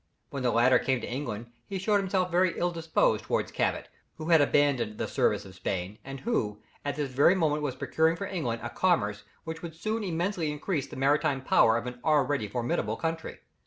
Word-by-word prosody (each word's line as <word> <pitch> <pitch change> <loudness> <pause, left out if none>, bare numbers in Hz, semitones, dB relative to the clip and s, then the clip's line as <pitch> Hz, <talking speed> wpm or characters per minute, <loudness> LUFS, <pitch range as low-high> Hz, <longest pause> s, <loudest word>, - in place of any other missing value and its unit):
When 140 - -4
the 125 - +2
latter 120 +2 +4
came 130 -2 0
to - - -5
England 120 -3 -5 0.2
he 195 - -3
showed 205 +2 +2
himself 185 -2 0
very 180 0 +2
ill 175 0 +1
disposed 165 -1 +1
towards - - -1
Cabot, - - -1 0.3
who 155 +1 -6
had 165 -3 +6
abandoned 140 -7 +2
the - - -2
service - - +1
of 95 - -11
Spain, 95 +1 -4
and 135 0 -8
who, 105 - -1 0.2
at 145 0 -2
this 145 -3 -3
very 145 +8 +5
moment 155 -4 +1
was 140 -4 -2
procuring 160 +1 +1
for 200 - -4
England 125 -13 -3
a 120 - -4
commerce 105 - +1 0.2
which 160 0 -6
would 165 -2 -7
soon 215 +6 -2
immensely 175 -2 -1
increase 150 0 -2
the - - -10
maritime 135 0 +1
power 115 -3 +4
of 115 - -4
an 125 0 -6
already 145 -6 +2
formidable 115 0 -1
country. 165 -1 -4
145 Hz, 200 wpm, -28 LUFS, 120-170 Hz, 0.3 s, had